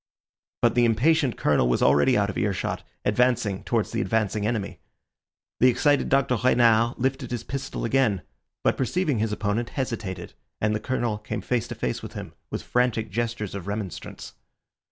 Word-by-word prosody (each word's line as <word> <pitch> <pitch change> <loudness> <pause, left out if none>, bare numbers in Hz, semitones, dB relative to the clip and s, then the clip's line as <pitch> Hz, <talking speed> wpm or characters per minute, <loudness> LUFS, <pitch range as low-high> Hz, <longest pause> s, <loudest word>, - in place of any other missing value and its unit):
But 120 - +5
the 120 - +3
impatient 130 +4 +2
Colonel 70 -4 +2
was - - +2
already 115 - +4
out 100 -1 +1
of - - -12
earshot, 100 -3 -1 0.2
advancing 110 -3 +1
towards 115 -3 0
the 115 - -1
advancing 110 -2 0
enemy. 110 -4 -3 0.8
The 125 - +6
excited 145 +3 +3
Dr. 135 -2 +2
Renard 120 -2 +4
lifted 130 0 -1
his 120 -2 -3
pistol 135 0 -4
again, 115 -7 +2 0.4
but - - +2
perceiving 145 0 0
his 110 0 0
opponent, 105 +3 -1
hesitated, 105 -9 -4 0.3
and 105 0 +1
the 105 - 0
Colonel 120 -2 -1
came 110 +1 -4
face 125 -2 -1
to - - -6
face 60 - -2
with - - -8
him - - -7 0.2
with - - -4
frantic 120 -3 0
gestures 115 -1 -2
of 100 -1 -6
remonstrance. 100 -3 -6
115 Hz, 165 wpm, -25 LUFS, 105-125 Hz, 0.8 s, The